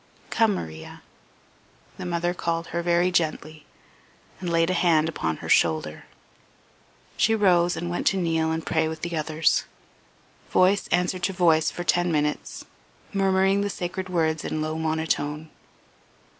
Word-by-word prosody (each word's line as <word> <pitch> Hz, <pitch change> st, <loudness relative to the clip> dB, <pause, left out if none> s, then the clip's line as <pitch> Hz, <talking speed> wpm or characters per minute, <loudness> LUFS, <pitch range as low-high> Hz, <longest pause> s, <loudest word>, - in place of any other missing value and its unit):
"Come, 220 Hz, -3 st, +3 dB
Maria." 80 Hz, -, -8 dB, 0.9 s
The -, -, -6 dB
mother 175 Hz, 0 st, -1 dB
called 170 Hz, -1 st, -3 dB
her 170 Hz, -, 0 dB
very 175 Hz, +1 st, +2 dB
gently, 155 Hz, -2 st, -2 dB, 0.7 s
and 180 Hz, -, -4 dB
laid 165 Hz, +1 st, +2 dB
a -, -, +1 dB
hand 165 Hz, -3 st, +3 dB
upon 80 Hz, -, -2 dB
her -, -, -5 dB
shoulder. 80 Hz, -2 st, +1 dB, 1.1 s
She 225 Hz, -, +3 dB
rose 175 Hz, -4 st, +3 dB
and 175 Hz, -, -4 dB
went 175 Hz, 0 st, -2 dB
to 195 Hz, -, +3 dB
kneel 165 Hz, -3 st, 0 dB
and 160 Hz, 0 st, -3 dB
pray 160 Hz, -1 st, +1 dB
with 160 Hz, 0 st, -6 dB
the 170 Hz, 0 st, -3 dB
others. 155 Hz, 0 st, +1 dB, 0.8 s
Voice 190 Hz, +2 st, +3 dB
answered 180 Hz, +1 st, 0 dB
to 190 Hz, +2 st, -1 dB
voice 165 Hz, -3 st, +3 dB
for 175 Hz, -, -6 dB
ten 175 Hz, 0 st, +1 dB
minutes, 150 Hz, -1 st, -2 dB, 0.5 s
murmuring 195 Hz, 0 st, +2 dB
the 205 Hz, -, -1 dB
sacred 185 Hz, 0 st, -5 dB
words 160 Hz, -3 st, 0 dB
in 155 Hz, -, -3 dB
low 155 Hz, 0 st, -2 dB
monotone. 160 Hz, -1 st, -2 dB
170 Hz, 145 wpm, -25 LUFS, 160-180 Hz, 1.1 s, Come